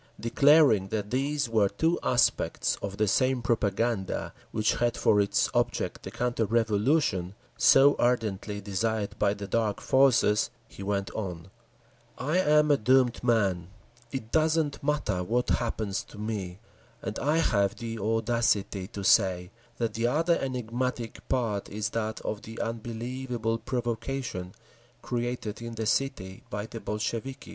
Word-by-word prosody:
Declaring 140 -4 +5
that 105 0 -3
these 140 +2 0
were 110 -3 +2
two 160 - 0
aspects 125 -1 +1
of 100 0 -5
the 110 - +2
same 130 +3 +2
propaganda, 110 -2 -1 0.2
which 110 0 0
had 120 -1 0
for 105 - +4
its 100 - +2
object - - -1
the - - -7
counter 120 +1 -1
revolution, 105 - +1 0.2
so 140 +2 +6
ardently 110 -4 0
desired 100 +1 -2
by 100 - +2
the 100 0 -6
Dark 105 +1 0
Forces, 130 -6 +3 0.2
he 100 - -12
went 100 0 -2
on: 90 -4 -6 0.7
"I 150 +8 0
am 150 -3 +4
a 145 - +5
doomed 125 +1 +3
man, 100 -8 +1 0.4
it 115 -4 -5
doesn't 155 -2 +1
matter 140 -11 0
what 120 +6 0
happens 110 -4 -1
to - - -14
me, 105 -4 -4 0.5
and 110 -2 -4
I 150 +3 +1
have 100 -11 +2
the 115 -1 -5
audacity 110 -3 0
to 100 -2 -7
say 95 -3 +3 0.3
that 115 -2 -1
the 115 +1 0
other 165 +6 +2
enigmatic 125 -2 -3
part 115 -6 -1
is 105 0 -2
that 110 -1 -2
of 105 -1 -4
the 110 +1 -9
unbelievable 115 0 -3
provocation 115 -6 -3 0.5
created 120 -3 -3
in 115 0 -6
the 110 0 -3
city 105 -6 -1
by 105 +1 -4
the 115 - -8
Bolsheviki!" 115 +6 -4
115 Hz, 140 wpm, -28 LUFS, 105-125 Hz, 0.7 s, so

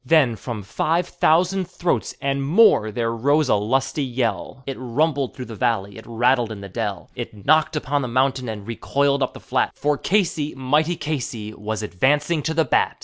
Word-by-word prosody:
Then 135 -4 +4
from 110 -2 -6
five 165 - 0
thousand 180 +4 +2
throats 175 -1 -2
and 140 -1 -1
more 145 - +4
threr 115 +1 -1
rose 145 +4 +2
a - - +5
lusty 135 +7 0
yell, 125 0 -2
It 135 - -4
rumbled 140 +2 0
through 130 - -6
the 115 - -8
valley, 100 -2 -1
it - - -13
rattled 120 0 +2
in 105 -2 -7
the 100 - -8
dell, - - -4
It 105 -2 -7
knocked 155 +1 +3
upon 145 -1 0
the 130 - -2
mountain 130 0 0
and 105 -2 -6
recoiled 140 +5 0
upon - - 0
the - - -10
flat, - - -1
For 145 -1 0
Casey, 170 -6 0
mighty 150 +6 +1
Casey, 120 -9 -4
was 110 +1 -4
advancing 145 - +1
to 160 +3 -2
the 160 -1 +3
bat. - - +1
135 Hz, 190 wpm, -22 LUFS, 115-155 Hz, -, a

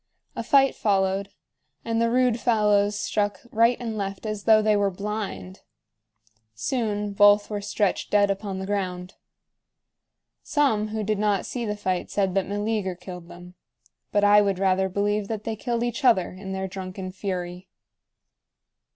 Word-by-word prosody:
A - - -3
fight 270 +3 +4
followed, 195 -1 0 0.6
and 230 0 0
the 230 - +2
rude 250 -1 +2
fellows 210 -3 +2
struck 205 -1 -1
right 230 +2 +3
and 230 -3 -4
left 195 0 -4
as 215 -1 -4
though 220 -1 +6
they 215 0 +3
were 200 -1 +2
blind. 200 -1 -5 1.0
Soon 210 - -2
both 205 +1 +5
were 205 -1 -2
stretched 200 -1 -1
dead 205 -1 +3
upon 195 -1 -4
the 190 - -4
ground. 185 -2 -3 1.3
Some 245 -8 +1
who 215 0 -3
did 210 0 -1
not 205 -2 +1
see 240 -3 -4
the 210 0 -3
fight 185 -3 -2
said 195 -2 0
that 195 -1 0
Meleager 205 -2 -2
killed 180 -1 -10
them, 180 +1 -12 0.6
but 205 - +2
I 205 0 +7
would 200 -2 0
rather 190 0 +2
believe 205 +1 0
that 215 -1 -4
they 225 0 -3
killed 235 +2 -2
each 240 +3 -3
other 230 -8 +4
in 190 +1 -8
their 190 0 -3
drunken 185 0 -6
fury. 185 -1 -5
205 Hz, 160 wpm, -25 LUFS, 190-215 Hz, 1.3 s, I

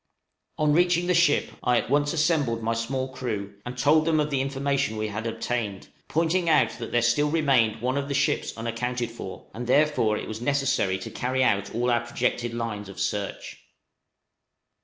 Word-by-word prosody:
On 150 -1 +2
reaching 175 +1 +3
the 180 - +2
ship, 170 -4 +3
I 125 -1 +2
at 120 - -2
once 145 +1 +2
assembled 150 -8 +1
my 115 +1 +1
small 130 +3 -2
crew, 105 -6 -4
and 125 0 -6
told 150 +4 +4
them 160 -1 +2
of 150 0 0
the 135 -2 +1
information 135 -3 -1
we 110 0 -2
had 110 +2 -4
obtained, 110 -3 -3 0.2
pointing 170 +2 +1
out 155 -2 +4
that 115 - -6
there 120 -1 +2
still 135 +5 +2
remained 135 -9 +2
one 130 +3 +1
of 140 - -4
the 140 - -2
ships 140 -3 0
unaccounted 120 +1 -3
for, 105 -5 -9
and 120 +1 -6
therefore 140 -6 +3
it - - -5
was 110 +1 -6
necessary 135 -8 +1
to 95 - -8
carry 130 +1 0
out 100 -3 +1
all 120 +1 +1
our 120 -1 +2
projected 120 0 -1
lines 115 -4 -4
of 95 - -10
search. 100 0 -3
125 Hz, 185 wpm, -26 LUFS, 115-145 Hz, 0.2 s, told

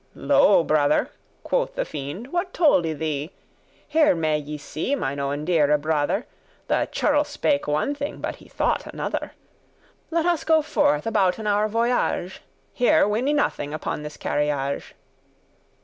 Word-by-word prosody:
"Lo, - - +4
brother," - - +2 0.3
quoth - - -1
the - - -1
fiend, 150 - -6
"what 355 +1 -2
told 285 - +4
I 160 - -1
thee? 155 -1 -3 0.6
Here 305 - +4
may 155 -2 0
ye 150 +1 -6
see, 155 - -3
mine 140 - -3
owen 140 +2 -2
deare 150 -4 +3
brother, 155 +7 0 0.4
The - - 0
churl 295 0 +2
spake 290 - -1
one 150 - 0
thing, 285 0 -5
but - - -4
he - - -17
thought - - -1
another. - - -4 0.8
Let 335 0 0
us 345 -2 +1
go 320 -1 +3
forth 150 - +1
abouten 215 -1 +1
our 210 +1 +2
voyage; 230 -5 -1 0.3
Here 245 -4 +4
win 220 +5 0
I - - +2
nothing 150 - -1
upon 155 - -4
this 150 0 -8
carriage." 145 -2 -2
190 Hz, 150 wpm, -24 LUFS, -, 0.8 s, Lo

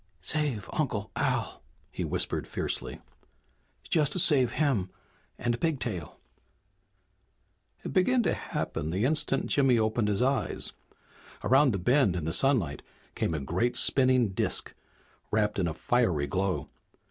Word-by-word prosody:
"Save 130 - -2
Uncle 110 -8 -2
Al!" - - -1 0.3
he - - -4
whispered - - -2
fiercely. - - -4 0.9
"Just 160 +2 +1
save 135 -7 +5
him 130 -11 0 0.5
and 120 0 -2
Pigtail!" 115 - -3 1.6
It - - -5
began 240 +7 +3
to - - +1
happen 75 - -4
the 95 +7 0
instant 140 -1 +1
Jimmy 135 -4 +3
opened 110 0 +1
his 105 +3 +1
eyes. 135 -3 0 0.7
Around 135 +1 +4
the 100 - -1
bend 120 - +2
in 85 -4 -3
the 80 - -2
sunlight 115 - +2 0.3
came 80 - -1
a - - -2
great 95 - -1
spinning 130 -4 +3
disk, 95 - -1 0.6
wrapped 105 -1 0
in 90 - +1
a 80 - -2
fiery 95 -13 +1
glow. 95 +6 -2
120 Hz, 130 wpm, -28 LUFS, 95-135 Hz, 1.6 s, save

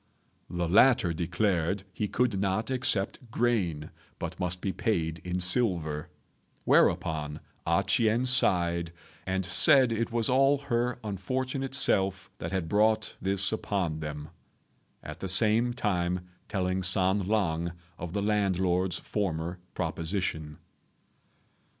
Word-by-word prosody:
The 85 -1 -2
latter 100 -1 +4
declared 90 +2 -1
he 105 - -2
could 115 -3 0
not 100 +5 -1
accept 125 -2 0
grain, 100 -11 -1 0.3
but 85 +2 -6
must 90 0 -1
be 95 - -2
paid 80 -6 -2
in 90 0 -3
silver; 90 -6 +1 0.5
whereupon 75 -1 +1 0.3
A - - +2
ch'ien 115 +2 +1
sighed 85 -8 +2 0.3
and 95 0 -1
said 130 +6 +7
it 115 0 -2
was 115 -1 +1
all 135 +2 +3
her 120 -2 -2
unfortunate 130 +7 -3
self 95 -5 +1
that - - -5
had 95 -4 -2
brought 110 +4 +1
this 100 +1 +4
upon 95 -7 -2
them, 75 -1 -7 0.7
at - - -9
the 95 - -5
same 110 +5 +3
time 90 -6 -2 0.2
telling 95 -1 -2
San 95 +1 +2
lang 85 -6 0 0.3
of 85 0 -6
the 100 -1 -2
landlord's 95 -3 0
former 90 -3 -3 0.2
proposition. 80 -4 -3
95 Hz, 120 wpm, -28 LUFS, 85-110 Hz, 0.7 s, said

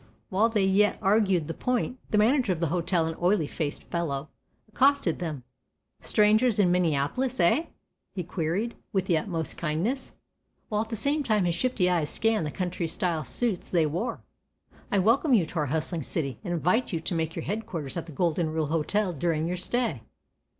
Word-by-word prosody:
While 215 +5 +3
they 215 -3 +1
yet 200 +2 +3
argued 195 -5 +2
the 165 - -3
point, 250 +3 -1
the 210 - +1
manager 240 +1 +3
of 175 - -1
the 165 -2 0
hotel, 175 -1 +1
an 160 0 -3
oily 180 -2 +3
faced 145 0 -4
fellow, 155 -4 -3 0.4
accosted 265 - +2
them: 155 -7 -4 0.6
"Strangers 215 +2 +3
in 190 -4 +4
Minneapolis, 180 - 0
eh?" 225 - +3 0.5
he 180 - -2
queried, 175 +7 -2 0.2
with 190 -3 0
utmost 165 -1 -1
kindness, 180 - -2 0.6
while 210 -1 +1
at 220 - -5
the 225 - -3
same 285 +7 +1
time 215 -8 +1
his 175 - +1
shifty 220 -2 +1
eyes 170 -5 +1
scanned 225 -7 +1
the - - -4
country 180 -1 -2
style 165 -1 -1
suits 215 - -2
they 170 -3 +3
wore. 170 +11 -2 0.7
"I 205 - +2
welcome 240 - +4
you 190 -7 +3
to 160 - -4
our 150 - 0
hustling 160 +3 -2
city, 140 -3 -3
and 175 - -4
invite 180 +8 +1
you 165 - -1
to 165 - -3
make 165 -1 -2
your - - -4
headquarters 195 -8 -4
at 170 -1 -4
the - - -9
"Golden 165 +1 0
Rule 160 0 -1
Hotel" 175 +6 0
during 160 +1 0
your 180 +1 -2
stay." 205 - -1
180 Hz, 185 wpm, -27 LUFS, 160-215 Hz, 0.7 s, in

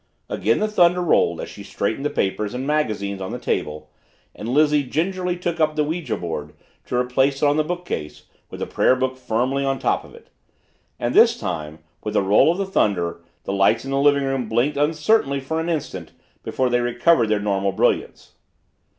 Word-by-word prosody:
Again 115 +2 +1
the 215 - +1
thunder 180 -4 +3
rolled 120 - +2
as - - -6
she 100 - -11
straightened 110 +5 -3
the 145 - 0
papers 105 +1 -2
and 130 +2 -3
magazines 105 -10 -1
on 95 - -4
the - - -4
table 75 0 -3 0.4
and 110 - -7
Lizzie 150 +2 +3
gingerly 180 +6 -2
took 175 -1 -3
up 155 -1 +2
the 150 - +2
ouija 155 -4 -3
board 80 -4 -5 0.3
to - - -3
replace 130 +3 +1
it - - +6
on 145 0 +3
the 155 - +3
bookcase 175 - -5 0.3
with - - -9
the - - 0
prayer 130 - +2
book 130 0 -1
firmly 130 +2 -1
on 135 0 0
top - - 0
of - - -15
it. - - -18 0.7
And - - -2
this - - +5
time, 75 +1 -5 0.2
with 105 0 -4
the - - +3
roll 105 +11 +5
of 175 - -3
the 195 - -1
thunder, 85 - 0 0.2
the 100 - -3
lights 100 +6 +2
in 135 - -5
the 135 - +1
living 140 0 +4
room 135 -4 -2
blinked 120 +6 +1
uncertainly 150 +1 +1
for 160 +4 -3
an 165 +1 -2
instant 130 - -4 0.3
before 130 -1 -1
they 120 0 +2
recovered 120 +2 +3
their 105 -1 +2
normal 100 -1 0
brilliance. 95 - -1
130 Hz, 200 wpm, -22 LUFS, 105-155 Hz, 0.7 s, it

